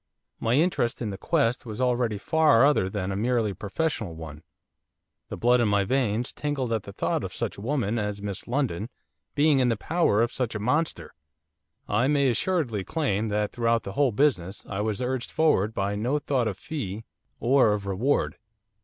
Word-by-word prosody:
My 115 +2 +1
interest 150 -6 +1
in 110 -4 -3
the - - -5
quest 135 -7 +1
was 110 -2 -7
already 120 -4 +1
far 150 +1 +4
other 140 -10 +3
than 95 -1 -3
a - - -2
merely 115 -1 +1
professional 105 - -3
one. 80 -2 -9 0.9
The - - -5
blood 125 +1 +3
in 115 - +3
my 100 -1 +2
veins 120 0 0
tingled 140 -5 -2
at 110 - 0
the 100 - -10
thought - - -1
of - - -6
such - - -2
a - - -10
woman 120 -3 -1
as 105 -1 -3
Miss 100 -2 -6
Lindon 120 -5 -1 0.5
being 145 -1 +4
in 125 -1 +3
the 115 - 0
power 145 -5 +2
of 120 - -1
such 125 -3 -2
a - - -2
monster. 125 - -1 0.7
I 120 - +2
may 140 -2 +3
assuredly 120 - 0
claim 115 - -1
that 105 0 -1
throughout 115 -1 +1
the 95 - -6
whole 140 0 +2
business 105 -7 0
I 100 0 -3
was 110 +3 -2
urged 125 0 -2
forward 135 -10 +2
by 100 -1 -2
no 120 +8 0
thought 135 -5 0
of 100 -3 -3
fee 110 -8 -5 0.3
or 120 -3 +4
of 100 -1 -6
reward. 100 +9 0
115 Hz, 190 wpm, -26 LUFS, 105-135 Hz, 0.9 s, far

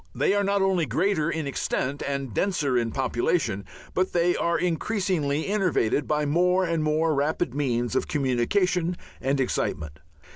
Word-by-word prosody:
They - - +2
are 205 0 +2
not 200 0 +1
only 185 -5 +1
greater 160 - +1
in 160 -2 -2
extent 140 0 -2
and 140 -4 -3
denser 150 - 0
in 120 -2 +1
population, 120 - 0 0.3
but 185 +1 0
they 175 0 +2
are 170 0 +1
increasingly 170 -4 0
innervated 180 - +1
by 150 0 +1
more 180 +5 +2
and 165 -2 0
more 155 +1 +1
rapid 145 0 0
means 125 -4 -1
of - - 0
communication 165 - +1 0.2
and 135 +1 0
excitement. 75 - -2
155 Hz, 150 wpm, -25 LUFS, 135-180 Hz, 0.3 s, They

